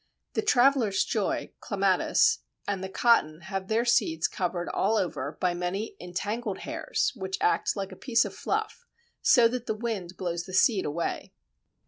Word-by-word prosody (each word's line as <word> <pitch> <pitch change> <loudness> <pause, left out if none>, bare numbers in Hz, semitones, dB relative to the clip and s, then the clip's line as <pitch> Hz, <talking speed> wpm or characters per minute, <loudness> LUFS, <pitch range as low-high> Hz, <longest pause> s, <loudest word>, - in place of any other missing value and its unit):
The - - +1
Traveller's 255 - +3
Joy - - -1
(Clematis) 455 0 +2 0.3
and 195 -2 -2
the 190 - -4
Cotton 175 -8 +2
have 190 +2 -5
their 225 +3 +1
seeds 215 -10 +2
covered 175 -1 -3
all 215 +3 +1
over 155 -6 -2
by 180 -1 +1
many 180 +5 -3
entangled 205 +4 -4
hairs, 315 -1 -1
which 190 -3 -4
act - - +1
like 195 -1 -4
a - - -9
piece 235 +2 +2
of - - -6
fluff, 435 +3 -3 0.3
so 240 -3 +6
that 245 0 -4
the 220 - -1
wind 210 -6 -4
blows 175 -2 -3
the 185 - -10
seed 195 0 +4
away. 160 +3 -3
200 Hz, 160 wpm, -27 LUFS, 180-235 Hz, 0.3 s, so